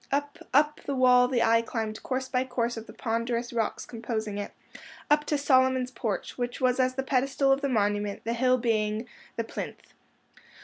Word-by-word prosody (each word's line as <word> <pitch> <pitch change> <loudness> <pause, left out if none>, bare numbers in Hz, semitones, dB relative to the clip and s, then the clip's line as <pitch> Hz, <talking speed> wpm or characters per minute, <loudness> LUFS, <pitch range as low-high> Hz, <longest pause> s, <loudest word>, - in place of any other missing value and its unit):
Up, 285 +1 -1
up 300 +3 +3
the 280 - -1
wall 250 -1 +5
the 245 -2 +1
eye 230 0 +4
climbed 220 -2 -4
course 260 0 -2
by 255 -1 0
course 240 -2 -1
of 225 0 -8
the - - -9
ponderous 235 +1 -2
rocks 225 -2 -1
composing 220 -3 -4
it—up 295 +7 -3
to 300 - 0
Solomon's 260 -2 +3
Porch, 230 -1 -4
which 245 0 -3
was 255 -1 +2
as 255 0 +2
the 265 - -1
pedestal 270 +1 +1
of 270 +1 +3
the 280 - 0
monument, 205 -3 0
the 230 - -1
hill 255 +1 +3
being 220 -1 0 0.3
the 230 - -1
plinth. - - -7
250 Hz, 180 wpm, -28 LUFS, 225-260 Hz, 0.3 s, wall